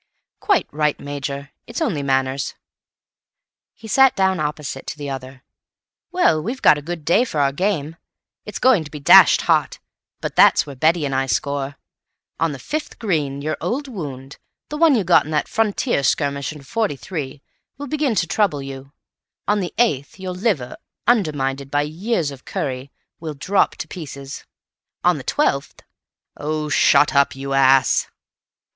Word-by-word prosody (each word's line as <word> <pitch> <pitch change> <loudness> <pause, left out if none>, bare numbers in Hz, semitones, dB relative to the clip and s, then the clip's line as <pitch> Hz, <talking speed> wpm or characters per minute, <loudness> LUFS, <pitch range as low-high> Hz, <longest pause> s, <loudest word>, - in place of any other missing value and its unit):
"Quite 400 -4 +1
right, 150 0 0
Major; 140 0 -5 0.2
it's 235 - -5
only 215 - -1
manners." 135 0 -1 1.2
He 225 - -12
sat 265 +4 +5
down 190 -2 +1
opposite 150 -3 -4
to - - -5
the 145 -1 -5
other. 130 0 -8 0.7
"Well, 170 - +3
we've 240 - -5
got 150 - +6
a - - -10
good 165 0 -6
day 195 +9 +4
for 195 -12 -3
our 140 -1 +3
game. 165 -1 -2 0.5
It's - - -7
going 255 -10 +4
to 150 - -10
be 150 - -8
dashed 140 - +7
hot, - - +1 0.4
but - - -5
that's - - +6
where 140 - -9
Betty 160 +4 +2
and 135 - -2
I 135 0 0
score. 140 +4 -2 0.6
On 165 -1 +1
the 140 - -6
fifth 300 - -5
green, 150 -10 -2
your 155 -1 -2
old 275 +4 -2
wound, 140 - -7 0.3
the 300 - -4
one 320 -3 +5
you 215 - +1
got 175 -4 +4
in - - -8
that 150 - 0
frontier 225 - 0
skirmish 140 +1 0
in 150 -2 -11
'43, 150 - -4 0.3
will 285 - -6
begin 285 -4 -1
to 180 - +2
trouble 165 -6 0
you; 135 0 -9 0.5
on 205 0 +2
the 180 -3 -3
eighth, 185 - 0
your 185 -1 -4
liver, 180 - -1 0.3
undermined 140 - 0
by 145 +1 +1
years 165 +1 -2
of 135 -2 -12
curry, 130 0 -4 0.3
will 155 -2 -6
drop 190 +8 +1
to - - -6
pieces; 140 -5 -8 0.6
on - - +3
the - - -8
twelfth—" - - -1 0.5
"Oh, 150 0 -3
shut 145 +1 +4
up, 140 -1 +3
you 135 0 -5
ass!" 135 -1 +4
150 Hz, 165 wpm, -21 LUFS, 140-195 Hz, 1.2 s, dashed